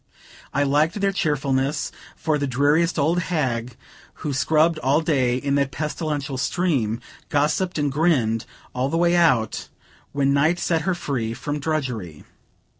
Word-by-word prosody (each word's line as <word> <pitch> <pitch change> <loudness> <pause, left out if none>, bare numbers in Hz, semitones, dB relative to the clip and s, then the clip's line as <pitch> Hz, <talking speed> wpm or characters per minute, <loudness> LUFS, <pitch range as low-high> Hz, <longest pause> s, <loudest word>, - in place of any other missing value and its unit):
I 145 - +1
liked 150 +7 +2
their 200 0 +2
cheerfulness, 145 -4 0 0.2
for 155 -2 0
the 140 - -1
dreariest 145 +7 +2
old 160 +4 +2
hag, 130 -9 -2 0.5
who 145 - -1
scrubbed 155 +3 +2
all 140 +2 +2
day 130 -6 +1
in 140 +2 -1
that 140 - 0
pestilential 150 -1 -3
steam, 135 -8 0 0.3
gossipped 155 +5 +1
and 145 -2 0
grinned 130 -8 +1 0.3
all 125 +2 -1
the 165 - 0
way 175 +1 +3
out, 135 -11 +2 0.4
when 140 -1 +1
night 155 +5 +3
set 165 -2 0
her 185 - +1
free 120 -8 -3
from 145 +3 -4
drudgery. 125 - -3
145 Hz, 145 wpm, -23 LUFS, 130-160 Hz, 0.5 s, way